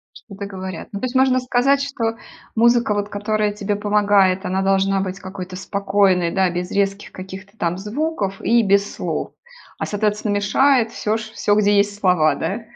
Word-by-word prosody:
Что-то 200 Hz, -2 st, -9 dB
говорят. 190 Hz, -3 st, -7 dB
Ну 200 Hz, -, -4 dB
то -, -, -1 dB
есть 255 Hz, +1 st, -5 dB
можно 260 Hz, -1 st, +4 dB
сказать, 255 Hz, +2 st, +2 dB
что 235 Hz, -5 st, -2 dB, 0.4 s
музыка 235 Hz, -1 st, +3 dB
вот, 205 Hz, 0 st, -2 dB
которая 210 Hz, +1 st, -1 dB
тебе 205 Hz, 0 st, -2 dB
помогает, 205 Hz, -2 st, +2 dB
она 190 Hz, +1 st, -1 dB
должна 195 Hz, 0 st, +2 dB
быть 190 Hz, 0 st, -4 dB
какой-то 185 Hz, -1 st, -8 dB
спокойной, 195 Hz, -2 st, +1 dB
да, 190 Hz, -1 st, +2 dB
без 175 Hz, +1 st, -4 dB
резких 200 Hz, 0 st, -1 dB
каких-то 190 Hz, +2 st, -10 dB
там 175 Hz, -2 st, -1 dB
звуков 210 Hz, -1 st, -3 dB
и 235 Hz, 0 st, +3 dB
без 200 Hz, 0 st, +2 dB
слов. -, -, -3 dB, 0.5 s
А, -, -, -1 dB
соответственно, 210 Hz, 0 st, -1 dB
мешает 230 Hz, +4 st, +3 dB
всё 215 Hz, +1 st, -1 dB
ш 220 Hz, -, -9 dB
всё, 205 Hz, -, +1 dB
где 205 Hz, -1 st, +3 dB
есть 205 Hz, 0 st, +1 dB
слова, 180 Hz, -6 st, +3 dB
да? 220 Hz, +4 st, -3 dB
205 Hz, 175 wpm, -20 LUFS, 190-220 Hz, 0.5 s, можно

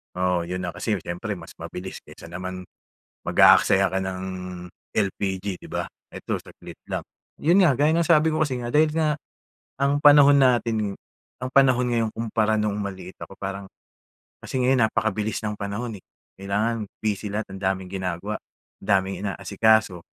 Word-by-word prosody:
Oo 90 Hz, -1 st, +1 dB
'yon 90 Hz, +1 st, -3 dB
na 90 Hz, -, -3 dB
kasi -, -, -2 dB
siyempre 95 Hz, +4 st, -4 dB
mas -, -, -11 dB
mabilis 95 Hz, +1 st, -7 dB
kesa -, -, -13 dB
naman 90 Hz, +1 st, -5 dB, 0.6 s
mag-aaksaya 95 Hz, 0 st, +5 dB
ka 95 Hz, -, +1 dB
ng 95 Hz, -1 st, -4 dB, 0.7 s
LPG 95 Hz, -2 st, -1 dB
'di -, -, -11 dB
ba? -, -, -2 dB, 0.2 s
Eto -, -, -4 dB
saglit -, -, -13 dB
lang. -, -, -3 dB, 0.3 s
'Yon 175 Hz, +5 st, +4 dB
nga 160 Hz, -7 st, +5 dB
gaya 150 Hz, +2 st, +3 dB
ng 170 Hz, 0 st, +2 dB
sabi 160 Hz, -1 st, +4 dB
ko 155 Hz, -, 0 dB
kasi 135 Hz, -5 st, 0 dB
nga 120 Hz, 0 st, -5 dB
dahil 155 Hz, +1 st, +5 dB, 0.9 s
ang 140 Hz, +1 st, +2 dB
panahon 145 Hz, -1 st, +8 dB
natin 115 Hz, -6 st, +2 dB, 0.5 s
ang 130 Hz, -, -3 dB
panahon 125 Hz, -2 st, +4 dB
ngayon 115 Hz, -2 st, +1 dB
kumpara 110 Hz, -1 st, 0 dB
noong 105 Hz, -1 st, 0 dB
maliit 95 Hz, -2 st, -6 dB
ako 95 Hz, -, -9 dB
parang 100 Hz, 0 st, -5 dB, 0.8 s
kasi 130 Hz, -1 st, -2 dB
ngayon 125 Hz, -3 st, +4 dB
napakabilis 110 Hz, 0 st, -1 dB
ng 105 Hz, -, -2 dB
panahon, 105 Hz, +3 st, -4 dB
eh, -, -, -24 dB, 0.4 s
kailangan 105 Hz, +3 st, -1 dB, 0.2 s
busy 105 Hz, -1 st, -1 dB
lahat 110 Hz, -1 st, -3 dB
ang -, -, -10 dB
daming 95 Hz, -1 st, -1 dB
ginagawa 95 Hz, +2 st, -3 dB, 0.5 s
ang -, -, -11 dB
daming 95 Hz, -1 st, +2 dB
inaasikaso 105 Hz, -1 st, +2 dB
105 Hz, 160 wpm, -24 LUFS, 95-125 Hz, 0.9 s, panahon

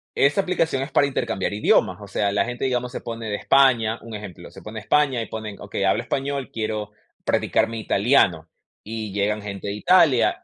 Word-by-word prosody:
esta 150 Hz, +7 st, +3 dB
aplicación 165 Hz, -7 st, 0 dB
es 135 Hz, -, -8 dB
para 140 Hz, -, +3 dB
intercambiar 115 Hz, -8 st, -2 dB
idiomas, 100 Hz, -3 st, +2 dB
o 100 Hz, -, -9 dB
sea, 100 Hz, +1 st, 0 dB
la 100 Hz, -, +1 dB
gente, 120 Hz, +2 st, -4 dB
digamos, 125 Hz, -1 st, -1 dB
se -, -, -6 dB
pone 115 Hz, -1 st, -6 dB
de 105 Hz, -, -1 dB
España, 120 Hz, -3 st, +3 dB
un 115 Hz, -, -9 dB
ejemplo, 105 Hz, -4 st, -9 dB
se -, -, -13 dB
pone 110 Hz, -, -9 dB
de -, -, -11 dB
España 130 Hz, 0 st, +2 dB
y -, -, -7 dB
ponen, 110 Hz, -3 st, -7 dB
okey, -, -, -4 dB
hablo -, -, +2 dB
español, 140 Hz, -1 st, -3 dB
quiero 110 Hz, -2 st, -3 dB, 0.3 s
practicar -, -, +1 dB
mi 115 Hz, 0 st, -5 dB
italiano, 100 Hz, -, +2 dB, 0.4 s
y 110 Hz, -1 st, -5 dB
llegan 105 Hz, +1 st, 0 dB
gente 100 Hz, -1 st, -6 dB
de -, -, -2 dB
Italia. 145 Hz, -, +3 dB
115 Hz, 200 wpm, -23 LUFS, 105-135 Hz, 0.4 s, esta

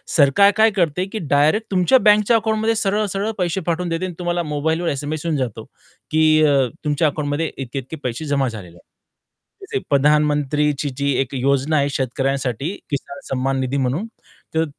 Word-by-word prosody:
सरकार 160 Hz, +7 st, +5 dB
काय 220 Hz, 0 st, +5 dB
करते 180 Hz, -2 st, 0 dB
की 205 Hz, +3 st, -6 dB
डायरेक्ट 155 Hz, +10 st, +3 dB
तुमच्या 185 Hz, +7 st, +4 dB
बँकच्या 210 Hz, +2 st, +4 dB
अकाउंटमध्ये 220 Hz, 0 st, 0 dB
सरळ-सरळ 205 Hz, 0 st, -1 dB
पैसे 180 Hz, 0 st, -1 dB
पाठवून 175 Hz, +1 st, -1 dB
देते 165 Hz, +2 st, -2 dB
आणि 180 Hz, -, -5 dB
तुम्हाला 175 Hz, 0 st, -1 dB
मोबाईलवर 160 Hz, +3 st, -1 dB
एस-एम-एस 145 Hz, +3 st, -4 dB
येऊन 160 Hz, -3 st, 0 dB
जातो, 115 Hz, -4 st, -3 dB, 0.5 s
की 155 Hz, 0 st, +4 dB
अ, 140 Hz, -3 st, +3 dB, 0.2 s
तुमच्या 150 Hz, +2 st, +2 dB
अकाउंटमध्ये 150 Hz, +2 st, -2 dB
इतके-इतके 135 Hz, +3 st, -6 dB
पैसे 125 Hz, +5 st, -3 dB
जमा 140 Hz, -2 st, +1 dB
झालेले 95 Hz, -7 st, -10 dB
आहेत. -, -, -24 dB, 0.8 s
जसे 405 Hz, 0 st, -3 dB
प्रधानमंत्रीची 150 Hz, 0 st, +2 dB
जी 140 Hz, 0 st, 0 dB
एक 135 Hz, 0 st, -4 dB
योजना 140 Hz, +3 st, +1 dB
आहे, 140 Hz, 0 st, +1 dB
शेतकऱ्यांसाठी 135 Hz, -, -2 dB, 0.2 s
किसान 140 Hz, 0 st, -5 dB
सम्मान 135 Hz, +1 st, -1 dB
निधी 130 Hz, +1 st, -1 dB
म्हणून, 135 Hz, -, -1 dB, 0.5 s
तर 160 Hz, 0 st, +2 dB
150 Hz, 160 wpm, -20 LUFS, 140-180 Hz, 0.8 s, सरकार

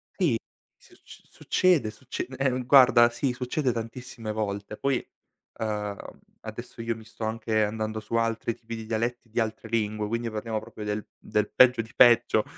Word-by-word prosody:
Sì, 160 Hz, -, +2 dB, 0.4 s
succ -, -, -17 dB
succede, 170 Hz, -12 st, +2 dB
succe 130 Hz, +4 st, -6 dB
eh 135 Hz, -1 st, +2 dB
no 125 Hz, 0 st, -2 dB
guarda, 125 Hz, -2 st, +7 dB
sì, 120 Hz, +2 st, -1 dB
succede 125 Hz, +2 st, -1 dB
tantissime 115 Hz, -1 st, -6 dB
volte. 105 Hz, -1 st, -3 dB
Poi, 135 Hz, 0 st, 0 dB, 0.5 s
ehm, 105 Hz, -2 st, -2 dB, 0.4 s
adesso -, -, -8 dB
io 115 Hz, 0 st, -1 dB
mi 110 Hz, -, -12 dB
sto 110 Hz, -, -9 dB
anche 110 Hz, -1 st, 0 dB
andando 110 Hz, +1 st, -2 dB
su 110 Hz, +1 st, -10 dB
altri 115 Hz, 0 st, 0 dB
tipi 115 Hz, 0 st, -8 dB
di 110 Hz, -1 st, -7 dB
dialetti 115 Hz, +1 st, -2 dB
di 115 Hz, -, -2 dB
altre 110 Hz, 0 st, -2 dB
lingue, 105 Hz, -1 st, -1 dB
quindi 115 Hz, +2 st, -2 dB
parliamo 110 Hz, 0 st, -3 dB
proprio 105 Hz, 0 st, -9 dB
del 105 Hz, 0 st, -2 dB
del 105 Hz, 0 st, -1 dB
peggio 125 Hz, -2 st, +6 dB
di 115 Hz, -, -12 dB
peggio. 120 Hz, -2 st, +6 dB
115 Hz, 165 wpm, -27 LUFS, 110-120 Hz, 0.5 s, guarda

